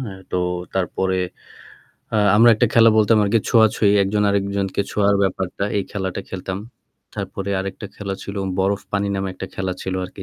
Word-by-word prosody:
হ্যাঁ, 100 Hz, -7 st, -7 dB
তো -, -, -1 dB, 0.4 s
তারপরে 95 Hz, 0 st, 0 dB, 1.0 s
আ -, -, +1 dB, 0.2 s
আমরা 115 Hz, +2 st, +7 dB
একটা 120 Hz, -, +2 dB
খেলা 115 Hz, -1 st, +7 dB
বলতাম 110 Hz, +1 st, +4 dB
আরকি 105 Hz, +3 st, +3 dB
ছোঁয়াছুঁয়ি। 110 Hz, -2 st, +4 dB
একজন 105 Hz, +2 st, 0 dB
আরেকজনকে 100 Hz, 0 st, -1 dB
ছোঁয়ার 100 Hz, -1 st, +2 dB
ব্যাপারটা। 95 Hz, +1 st, -1 dB
এই 100 Hz, -, +1 dB
খেলাটা 95 Hz, -1 st, -3 dB
খেলতাম। 95 Hz, 0 st, -5 dB, 0.6 s
তারপরে 100 Hz, 0 st, -4 dB
আরেকটা 100 Hz, +2 st, -6 dB
খেলা 100 Hz, -2 st, -4 dB
ছিল 100 Hz, -, -7 dB, 0.2 s
'বরফ 100 Hz, +1 st, +1 dB
পানি' 100 Hz, 0 st, 0 dB
নামে 95 Hz, 0 st, -2 dB
একটা 95 Hz, -, -6 dB
খেলা 95 Hz, -1 st, -2 dB
ছিল 95 Hz, 0 st, -3 dB
আরকি। 95 Hz, +1 st, -9 dB
100 Hz, 165 wpm, -21 LUFS, 95-105 Hz, 1.0 s, আমরা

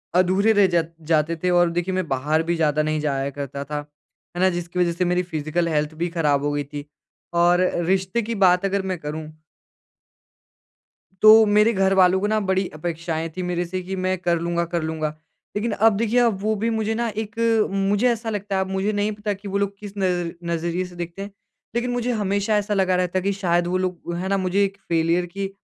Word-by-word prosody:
अधूरे 190 Hz, +4 st, +3 dB
रह 200 Hz, -2 st, +5 dB
ज 165 Hz, -2 st, +3 dB, 0.3 s
जाते 155 Hz, +1 st, +2 dB
थे 180 Hz, -, +2 dB
और 175 Hz, -, +4 dB
देखिए 180 Hz, +2 st, -1 dB
मैं 185 Hz, -3 st, -1 dB
बाहर 150 Hz, +5 st, 0 dB
भी 170 Hz, -, +2 dB
ज़्यादा 155 Hz, -2 st, +1 dB
नहीं 155 Hz, 0 st, 0 dB
जाया 135 Hz, -1 st, -1 dB
करता 140 Hz, 0 st, -4 dB
था। 150 Hz, +1 st, -4 dB, 0.6 s
है 175 Hz, -, -2 dB
ना, 185 Hz, -, +5 dB
जिसकी 175 Hz, 0 st, -4 dB
वज़ह 175 Hz, -1 st, +3 dB
से 180 Hz, +1 st, -1 dB
मेरी 180 Hz, +1 st, +1 dB
फ़िजिकल 155 Hz, +2 st, -1 dB
हेल्थ 150 Hz, -1 st, 0 dB
भी 175 Hz, -, 0 dB
ख़राब 145 Hz, -3 st, +2 dB
हो 145 Hz, -, 0 dB
गई 145 Hz, 0 st, -1 dB
थी 145 Hz, +1 st, -8 dB, 0.6 s
और 175 Hz, +1 st, +4 dB, 0.2 s
रिश्ते 190 Hz, +5 st, +1 dB
की 230 Hz, +1 st, -4 dB
बात 180 Hz, +2 st, +4 dB
अगर 195 Hz, 0 st, 0 dB
मैं 185 Hz, -, -2 dB
करूँ 155 Hz, +1 st, -5 dB, 2.0 s
तो 220 Hz, 0 st, +9 dB
मेरे 215 Hz, +2 st, +5 dB
घर 195 Hz, 0 st, +2 dB
वालों 185 Hz, 0 st, +5 dB
को 205 Hz, -, +1 dB
ना 215 Hz, 0 st, +1 dB
बड़ी 190 Hz, 0 st, +1 dB
अपेक्षाएँ 165 Hz, 0 st, -3 dB
थीं 185 Hz, -, -2 dB
मेरे 175 Hz, 0 st, -1 dB
से 185 Hz, +2 st, -4 dB
कि 190 Hz, +1 st, -4 dB
मैं 185 Hz, 0 st, +1 dB
कर 175 Hz, -1 st, +1 dB
लूँगा 170 Hz, 0 st, -1 dB
कर 170 Hz, -1 st, 0 dB
लूँगा। 155 Hz, -1 st, -2 dB, 0.5 s
लेकिन 215 Hz, +2 st, -1 dB
अब 220 Hz, 0 st, +3 dB
देखिए 230 Hz, +2 st, +2 dB
अब 230 Hz, -5 st, +2 dB
वो 215 Hz, +1 st, +1 dB
भी 230 Hz, -, +2 dB
मुझे 220 Hz, 0 st, -1 dB
न -, -, 0 dB, 0.2 s
एक 215 Hz, +1 st, -13 dB, 0.4 s
मुझे 200 Hz, +4 st, +2 dB
ऐसा 230 Hz, -1 st, -3 dB
लगता 205 Hz, -2 st, -3 dB
है 190 Hz, -, +2 dB
अब 190 Hz, -, -2 dB
मुझे 190 Hz, +2 st, 0 dB
नहीं 205 Hz, +1 st, 0 dB
पता 210 Hz, 0 st, -3 dB
कि 200 Hz, +1 st, -10 dB
वो 200 Hz, 0 st, -1 dB
लोग 200 Hz, 0 st, -2 dB
किस 205 Hz, -1 st, -9 dB
नज़ 180 Hz, -3 st, 0 dB, 0.2 s
नज़रिए 170 Hz, +2 st, -1 dB
से 180 Hz, -1 st, -12 dB
देखते 175 Hz, +2 st, -6 dB
हैं 200 Hz, 0 st, -6 dB, 0.4 s
लेकिन 245 Hz, +1 st, 0 dB
मुझे 245 Hz, 0 st, -1 dB
हमेशा 200 Hz, +2 st, 0 dB
ऐसा 210 Hz, 0 st, -1 dB
लगा 190 Hz, -2 st, +2 dB
रहता 180 Hz, 0 st, 0 dB
है -, -, -5 dB
कि 200 Hz, +1 st, +1 dB
शायद 175 Hz, -3 st, +1 dB
वो 185 Hz, +1 st, 0 dB
लोग 180 Hz, -2 st, -3 dB
हैं 185 Hz, +2 st, -3 dB
ना, 195 Hz, -, +2 dB
मुझे 190 Hz, +2 st, +1 dB
एक 195 Hz, 0 st, -2 dB
फ़ेलियर 170 Hz, +2 st, +2 dB
की 195 Hz, +2 st, -5 dB
185 Hz, 220 wpm, -23 LUFS, 170-200 Hz, 2.0 s, तो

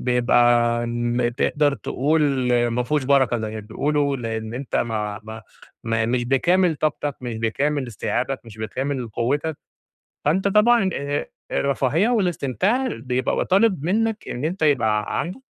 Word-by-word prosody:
بيبقى 120 Hz, -1 st, +3 dB
ن 120 Hz, 0 st, -1 dB
تقدر 145 Hz, +2 st, +1 dB
تقول 135 Hz, -5 st, +1 dB
ما 120 Hz, +1 st, 0 dB
فيهوش 145 Hz, +1 st, -1 dB
بَرَكة 130 Hz, -3 st, +3 dB
زي 110 Hz, 0 st, -4 dB
ما 110 Hz, -, -4 dB
بتقولوا 140 Hz, +6 st, -1 dB
لإن 110 Hz, -1 st, -4 dB
أنت 130 Hz, 0 st, -3 dB
ما 105 Hz, -2 st, -2 dB
ما 110 Hz, 0 st, -9 dB, 0.4 s
ما 115 Hz, 0 st, 0 dB
مش 120 Hz, 0 st, 0 dB
بكامل 170 Hz, +6 st, +2 dB
طاقتك، 145 Hz, -1 st, -1 dB
مش 120 Hz, -3 st, -5 dB
بكامل 135 Hz, +5 st, 0 dB
استيعابك، 125 Hz, +4 st, -2 dB
مش 110 Hz, -1 st, -13 dB
بكامل 130 Hz, +2 st, -3 dB
قوّتك، 145 Hz, +8 st, -1 dB, 0.7 s
فأنت 190 Hz, +7 st, +2 dB
طبعًا 210 Hz, -1 st, +4 dB
آآ 140 Hz, +1 st, -3 dB, 0.2 s
الرفاهية 140 Hz, -, +1 dB
والاستمتاع 200 Hz, -, 0 dB
بيبقى 130 Hz, -, -2 dB
و -, -, +1 dB
طالب 190 Hz, -5 st, +2 dB
منّك 220 Hz, +4 st, 0 dB
إن 125 Hz, +5 st, -4 dB
أنت 170 Hz, +1 st, -3 dB
يبقى 120 Hz, -8 st, +3 dB
ع -, -, -3 dB
عندك 185 Hz, +10 st, -4 dB
130 Hz, 145 wpm, -22 LUFS, 120-155 Hz, 0.7 s, طبعًا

